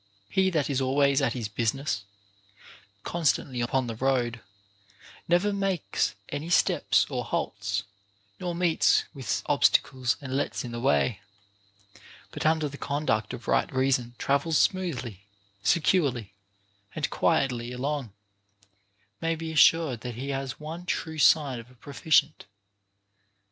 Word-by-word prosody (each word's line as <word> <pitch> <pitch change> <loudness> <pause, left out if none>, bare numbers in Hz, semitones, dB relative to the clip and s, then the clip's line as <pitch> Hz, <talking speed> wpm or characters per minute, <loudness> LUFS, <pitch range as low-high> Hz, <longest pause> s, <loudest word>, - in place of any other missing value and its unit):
He 190 0 +3
that 155 -6 0
is 135 -2 0
always 140 +1 +3
at 125 -4 +1
his 120 -4 -3
business, 110 -1 -2 1.0
constantly 140 -6 0
upon 130 +2 0
the 115 - -4
road, 120 -2 0 0.9
never 175 +4 +2
makes 195 -4 -1
any 145 +4 -4
steps 175 - +3
or - - -3
halts, 100 0 -2 0.6
nor 175 -2 -3
meets 170 -2 +3
with 130 -7 -3
obstacles 130 -1 +2
and 135 -3 -5
lets 140 - -1
in 120 - -6
the 120 - -5
way, 125 -4 +1 1.1
but - - -1
under 160 -1 +2
the 145 0 -9
conduct 140 -7 -1
of - - -8
right 60 0 +1
reason 130 -2 0
travels 140 +3 +1
smoothly, 130 - 0 0.4
securely, 125 - +1 0.6
and - - -2
quietly 120 -3 +1
along, 135 -1 -3 1.1
may 165 0 0
be 160 0 -5
assured 155 -5 +4
that 125 -2 -6
he 135 +4 -5
has 135 -1 -4
one 165 +4 -7
true 160 -3 -3
sign 145 -6 +4
of 115 +1 -12
a 125 - -19
proficient. 145 +3 +1
135 Hz, 130 wpm, -27 LUFS, 120-160 Hz, 1.1 s, assured